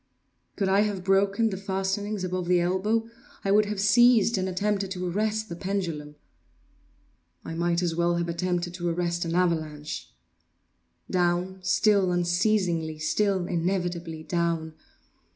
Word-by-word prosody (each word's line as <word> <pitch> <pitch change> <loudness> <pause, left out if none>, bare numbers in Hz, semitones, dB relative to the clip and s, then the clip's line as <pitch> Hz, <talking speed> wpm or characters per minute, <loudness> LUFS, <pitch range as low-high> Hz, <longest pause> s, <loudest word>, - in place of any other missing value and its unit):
Could 195 - 0
I 195 +1 +3
have 205 -3 0
broken 200 +3 +2
the 190 - -4
fastenings 195 +1 -2
above 185 -1 -2
the 180 0 +4
elbow, 200 +6 0 0.4
I 195 - +2
would 210 +1 +5
have 205 -1 -4
seized 230 +2 +5
and 190 -1 -1
attempted 195 +1 -1
to 185 -1 -3
arrest 215 +4 -1
the 170 - -6
pendulum. 170 -6 -3 1.3
I - - -5
might 170 +1 0
as 170 -2 0
well 170 0 +2
have 170 0 -1
attempted 175 +1 -2
to 175 -1 -2
arrest 175 0 -1
an 165 0 -2
avalanche! 155 -4 -1 1.0
Down—still 185 +2 +2
unceasingly—still 175 0 +1
inevitably 175 -2 -2
down! 165 -2 -1
180 Hz, 130 wpm, -26 LUFS, 170-200 Hz, 1.3 s, would